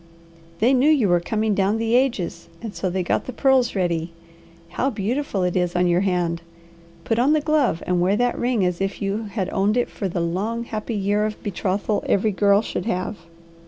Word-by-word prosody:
They 235 +8 +3
knew 265 +3 +4
you 280 -9 +4
were 175 0 +4
coming 215 +4 -1
down 200 +2 +1
the 225 0 -1
ages, 235 -10 0
and 225 -3 -7
so 185 - -2
they 185 +1 -1
got - - 0
the - - -5
pearls 260 -2 +2
ready. 170 -3 -1 0.6
How 255 +9 -1
beautiful 225 -2 -2
it 180 -1 0
is 180 -1 0
on 180 0 +3
your 175 +1 +2
hand! 175 -3 0 0.6
Put 225 0 0
on 270 +5 +4
the 310 - +3
glove 295 - +1
and 180 -1 +1
wear 190 +3 +3
that 245 +2 +1
ring 240 -5 +1
as 180 0 -1
if 195 0 -2
you 205 +3 -2
had 200 -2 -3
owned 205 +4 +1
it 245 - 0
for 200 - -3
the 175 - -3
long, 195 +8 -2
happy 225 0 -4
year 205 +1 +1
of 215 - -8
betrothal 200 +1 -1
every 210 +2 +2
girl 200 +1 +3
should 200 - -4
have. 185 +1 -2
205 Hz, 205 wpm, -22 LUFS, 180-235 Hz, 0.6 s, knew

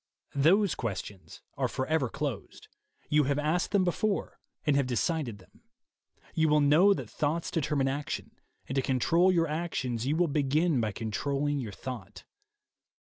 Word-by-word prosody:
Those 175 +8 +4
ques 110 -6 -3
tions 100 -3 -12 0.2
are - - +1
forever 135 -1 -1
closed: 140 -5 -5 0.4
you 150 -1 +3
have 140 +1 0
asked 155 +4 0
them 200 -2 +3
before 195 +3 -1 0.3
and 150 -2 +3
have 140 -2 +2
decided 130 -1 -1
them. 95 - -21 0.7
You 160 -2 +2
will 150 0 +4
know 150 +8 +5
that - - -6
thoughts 155 +3 -2
determine 145 -4 0
action, 140 +2 -3 0.4
and 135 - -4
to 135 - +3
control 165 +9 +3
your 165 -2 +2
actions 135 -7 -2
you 150 - +1
will 175 +1 +2
begin 150 0 +1
by 110 -1 -1
controlling 140 +7 -2
your 115 -6 -5
thought. 120 +2 -8
145 Hz, 155 wpm, -29 LUFS, 130-165 Hz, 0.7 s, know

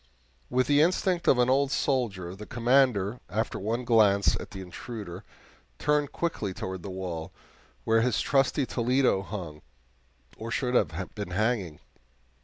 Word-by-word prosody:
With 125 +1 +2
the 145 0 +4
instinct 180 +1 +1
of - - +6
an 125 0 +3
old 135 +2 +3
soldier, 115 -12 -1
the 105 +1 -10
Commander, 120 -3 +2
after 110 +1 -2
one 115 +5 -2
glance 105 -4 +4
at - - -8
the 95 - -8
intruder, 95 -1 -8 0.5
turned 150 -1 +1
quickly 105 - -2
toward 95 -1 -5
the 100 - -7
wall, 90 -4 -5 0.5
where 115 - +3
his 120 -2 +1
trusty 135 0 +2
Toledo 125 -4 +2
hung, 90 -7 -7 0.8
or 115 - -6
should 125 +3 -1
have 90 -5 0
been 105 -3 -5
hanging. 100 -5 -1
115 Hz, 145 wpm, -28 LUFS, 95-130 Hz, 0.8 s, of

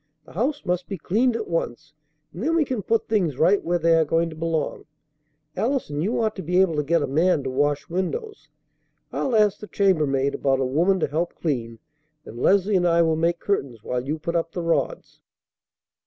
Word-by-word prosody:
The - - -15
house 260 - -2
must 180 0 -1
be 195 - -5
cleaned 225 +9 +1
at 225 -2 -3
once, 155 -3 -3 0.4
and 175 - -8
then 320 +7 +1
we 320 -3 +3
can 255 -6 -3
put 225 +4 0
things 180 - 0
right 195 +7 +3
where 175 +1 +1
they 165 0 +3
are 165 0 +5
going 165 +2 0
to - - -9
belong. 160 -1 -2 0.7
Allison, 225 - -1
you 205 +8 0
ought 220 -2 0
to - - -4
be 180 +2 +1
able 185 -4 +3
to 150 - +1
get 170 +4 +1
a - - -1
man 155 +2 +2
to 130 - -3
wash 145 +2 0
windows. 410 - -4 0.6
I'll 255 - -1
ask 210 -2 +3
the 210 - -9
chambermaid 150 -10 +1
about 135 -1 +1
a 135 - +1
woman 170 +9 +2
to - - +2
help 165 +4 -2
clean, 120 -8 -3 0.5
and 120 - -9
Leslie 200 +6 +3
and 175 -1 +2
I 170 0 +4
will 160 -1 +2
make 170 +2 0
curtains 130 - -2
while 125 0 -2
you 150 +4 -3
put 170 +2 -4
up 165 0 -1
the 175 - -3
rods." 170 - -2
170 Hz, 210 wpm, -24 LUFS, 150-200 Hz, 0.7 s, are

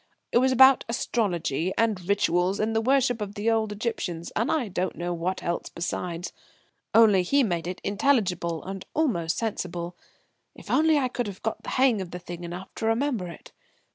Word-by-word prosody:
It - - +4
was 260 +1 +3
about 265 +1 +7
astrology 185 - -1
and 210 -5 0
rituals 190 -1 +2
and 220 +1 0
the 225 - +3
worship 250 -1 +2
of 205 0 -5
the 220 +2 +1
old 220 -2 +1
Egyptians, 200 -6 -3
and 225 - +1
I 290 -8 0
don't 185 -1 -2
know 175 +1 -3
what 175 +3 -3
else 170 0 -2
besides. 175 0 -4 0.6
Only, 215 -4 +7
he 280 +10 +3
made 175 -6 -1
it 180 +1 -4
intelligible 195 - +1
and 195 0 -6
almost 175 - 0
sensible, 175 -6 -3 0.6
if - - -9
only 315 0 +4
I 265 -3 +2
could 245 -2 -3
have 200 -2 -8
got 220 - -2
the - - -7
hang 255 -6 +3
of 185 - -6
the 180 - -6
thing 175 -1 -8
enough 175 +2 -7
to 220 - -1
remember 225 -4 0
it. 170 - -11
200 Hz, 185 wpm, -26 LUFS, 175-235 Hz, 0.6 s, about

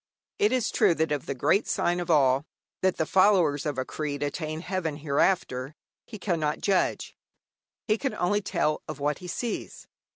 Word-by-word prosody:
It 210 - +3
is 255 -3 +1
true 170 - +3
that 160 -1 0
of 145 -3 -2
the - - -2
great 195 - +2
sign 175 +1 +1
of 175 -1 -4
all, 135 -3 +4 0.4
that 185 -1 +2
the 160 - +1
followers 180 -7 +3
of 145 -3 -2
a 130 - -1
creed 145 -2 -4
attain 155 +2 -3
heaven 180 -4 -2
hereafter, 145 -2 0 0.3
he 220 - -8
cannot 165 -6 -1
judge. 195 -2 0 0.7
He 215 0 +2
can 270 - -2
only 205 +4 +1
tell 155 -5 0
of - - -6
what 145 0 -1
he 180 - -9
sees. 230 +5 -4
160 Hz, 175 wpm, -27 LUFS, 145-190 Hz, 0.7 s, all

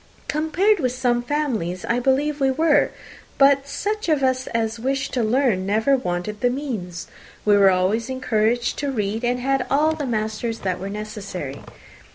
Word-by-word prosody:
"Compared 345 +8 +2
with 255 -5 0
some 245 -1 +1
families, 240 - -2
I 235 - +1
believe 280 +4 +1
we 270 - +4
were; 305 +3 +3 0.5
but 275 0 +4
such 420 +5 -3
of 300 -4 +2
us 260 0 +1
as 230 0 -2
wished 270 +3 -2
to 250 - +1
learn 230 -4 +2
never 220 +7 +3
wanted 210 -2 -3
the 245 - +3
means. 230 -11 -4 0.4
We 210 -1 +5
were 200 -1 +6
always 190 +6 +1
encouraged 240 -2 0
to 285 -1 -1
read, 215 -1 -2
and 245 +1 0
had 270 0 0
all 305 +3 +3
the 300 -3 -4
masters 220 0 -2
that 185 -2 -2
were 195 - -5
necessary. 200 -9 -6
245 Hz, 170 wpm, -22 LUFS, 210-275 Hz, 0.5 s, were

